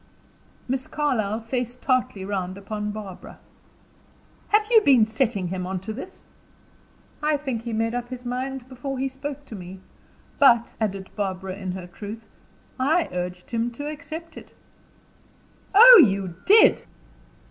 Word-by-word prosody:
Miss 260 Hz, +1 st, -2 dB
Carlyle 230 Hz, -8 st, -1 dB
faced 245 Hz, +1 st, -4 dB
tartly 255 Hz, -7 st, 0 dB
round 190 Hz, -2 st, -3 dB
upon 210 Hz, +1 st, -5 dB
Barbara. 205 Hz, -3 st, -8 dB, 1.1 s
"Have 425 Hz, 0 st, +3 dB
you 450 Hz, -2 st, +7 dB
been 260 Hz, -, +5 dB
setting 220 Hz, -5 st, -1 dB
him 185 Hz, 0 st, -4 dB
on 190 Hz, 0 st, -3 dB
to 215 Hz, +3 st, -5 dB
this?" 320 Hz, -, -10 dB, 1.0 s
"I 300 Hz, 0 st, +1 dB
think 265 Hz, -6 st, -4 dB
he 235 Hz, -, -6 dB
had 220 Hz, -, -2 dB
made 225 Hz, +1 st, 0 dB
up 245 Hz, 0 st, -4 dB
his 255 Hz, -1 st, -8 dB
mind 255 Hz, +1 st, -4 dB
before 265 Hz, +1 st, -6 dB
he 265 Hz, +1 st, -1 dB
spoke 280 Hz, +2 st, -7 dB
to 225 Hz, -, -9 dB
me. 185 Hz, 0 st, -9 dB, 0.6 s
But," 240 Hz, -4 st, +5 dB
added 195 Hz, -3 st, -3 dB
Barbara, 190 Hz, -2 st, -3 dB
in 190 Hz, -2 st, -5 dB
her 185 Hz, -1 st, -7 dB
truth, 210 Hz, +5 st, -9 dB, 0.5 s
"I 315 Hz, +6 st, +2 dB
urged 180 Hz, +2 st, -5 dB
him 230 Hz, 0 st, 0 dB
to 290 Hz, +5 st, -6 dB
accept 315 Hz, +3 st, -9 dB
it." -, -, -13 dB, 1.2 s
"Oh, 475 Hz, 0 st, +11 dB
you 195 Hz, -5 st, 0 dB
did! 425 Hz, +3 st, +6 dB
235 Hz, 145 wpm, -24 LUFS, 200-270 Hz, 1.2 s, Oh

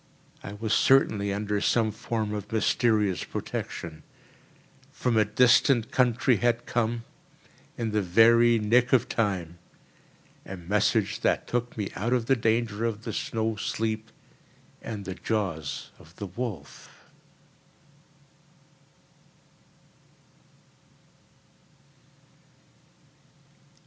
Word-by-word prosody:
I 100 Hz, -, -8 dB
was 110 Hz, +1 st, -2 dB
certainly 105 Hz, -7 st, +3 dB
under 105 Hz, 0 st, -2 dB
some 110 Hz, 0 st, +2 dB
form 110 Hz, 0 st, -3 dB
of 105 Hz, -1 st, -6 dB
mysterious 110 Hz, -3 st, +1 dB
protection. 80 Hz, -2 st, -6 dB, 0.9 s
From 125 Hz, -2 st, -1 dB
a 110 Hz, -, +5 dB
distant 120 Hz, +1 st, +3 dB
country 125 Hz, 0 st, +2 dB
had 120 Hz, +2 st, 0 dB
come, 115 Hz, 0 st, -1 dB, 0.7 s
in 115 Hz, -2 st, -2 dB
the 105 Hz, 0 st, +1 dB
very 115 Hz, +5 st, +5 dB
nick 120 Hz, +4 st, +2 dB
of 130 Hz, -, +4 dB
time, 90 Hz, -6 st, -2 dB, 0.8 s
a 95 Hz, -, -8 dB
message 105 Hz, +3 st, 0 dB
that -, -, +1 dB
took 120 Hz, -1 st, -3 dB
me 105 Hz, -3 st, -3 dB
out 115 Hz, +5 st, -1 dB
of 120 Hz, -2 st, +1 dB
the 135 Hz, -, +3 dB
danger 115 Hz, -2 st, 0 dB
of 115 Hz, -2 st, -2 dB
the -, -, -5 dB
snow 110 Hz, -1 st, -2 dB
sleep 110 Hz, +1 st, -3 dB, 0.7 s
and 105 Hz, -3 st, -6 dB
the 95 Hz, -, -4 dB
jaws 90 Hz, -8 st, -3 dB
of -, -, -18 dB
the 100 Hz, -, -6 dB
wolf. 95 Hz, -, -7 dB
110 Hz, 100 wpm, -27 LUFS, 100-115 Hz, 0.9 s, a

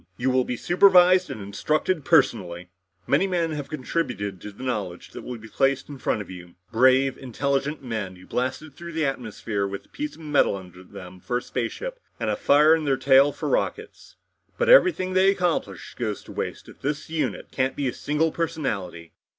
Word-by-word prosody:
You 130 Hz, +1 st, +1 dB
will 130 Hz, -1 st, +2 dB
be 125 Hz, -, -3 dB
supervised 180 Hz, +1 st, +5 dB
and -, -, -6 dB
instructed 155 Hz, -, -1 dB
personally. 90 Hz, -9 st, +2 dB, 0.4 s
"Many 195 Hz, -, +2 dB
men 170 Hz, -3 st, 0 dB
have 145 Hz, -2 st, -5 dB
contributed 125 Hz, -, -3 dB
to 105 Hz, -, -7 dB
the 105 Hz, +6 st, -11 dB
knowledge 105 Hz, -9 st, -4 dB
that -, -, -8 dB
will 125 Hz, -1 st, -6 dB
be 110 Hz, 0 st, -12 dB
placed 135 Hz, +4 st, 0 dB
in 140 Hz, -2 st, -8 dB
front 110 Hz, -, -1 dB
of -, -, -18 dB
you 90 Hz, -1 st, -11 dB, 0.2 s
brave, 130 Hz, +2 st, +4 dB
intelligent 140 Hz, +3 st, -2 dB
men, 110 Hz, -6 st, -4 dB
who 90 Hz, +1 st, -15 dB
blasted 130 Hz, +6 st, -3 dB
through 170 Hz, +3 st, -9 dB
the 160 Hz, -1 st, 0 dB
atmosphere 110 Hz, -6 st, -3 dB
with 100 Hz, 0 st, -7 dB
a -, -, -28 dB
piece 300 Hz, +1 st, -5 dB
of -, -, -15 dB
metal 150 Hz, -8 st, +2 dB
under 90 Hz, -2 st, -11 dB
them 90 Hz, 0 st, -11 dB
for 120 Hz, +7 st, -2 dB
a -, -, -3 dB
spaceship -, -, -4 dB, 0.2 s
and -, -, -1 dB
a -, -, 0 dB
fire 150 Hz, +2 st, +5 dB
in 160 Hz, -1 st, +1 dB
their 135 Hz, -2 st, +2 dB
tail 135 Hz, +2 st, +5 dB
for -, -, -5 dB
rockets. -, -, -3 dB, 0.4 s
But 480 Hz, 0 st, +1 dB
everything 355 Hz, -, +5 dB
they 190 Hz, +1 st, +5 dB
accomplished 175 Hz, -, -1 dB
goes 110 Hz, -4 st, -3 dB
to -, -, -12 dB
waste -, -, -5 dB
if -, -, -15 dB
the 145 Hz, +2 st, -1 dB, 0.2 s
unit 160 Hz, -, -2 dB
can't 130 Hz, 0 st, 0 dB
become 135 Hz, -3 st, -1 dB
a -, -, -13 dB
single 155 Hz, +2 st, 0 dB
personality. 100 Hz, -, -3 dB
130 Hz, 195 wpm, -25 LUFS, 105-160 Hz, 0.4 s, supervised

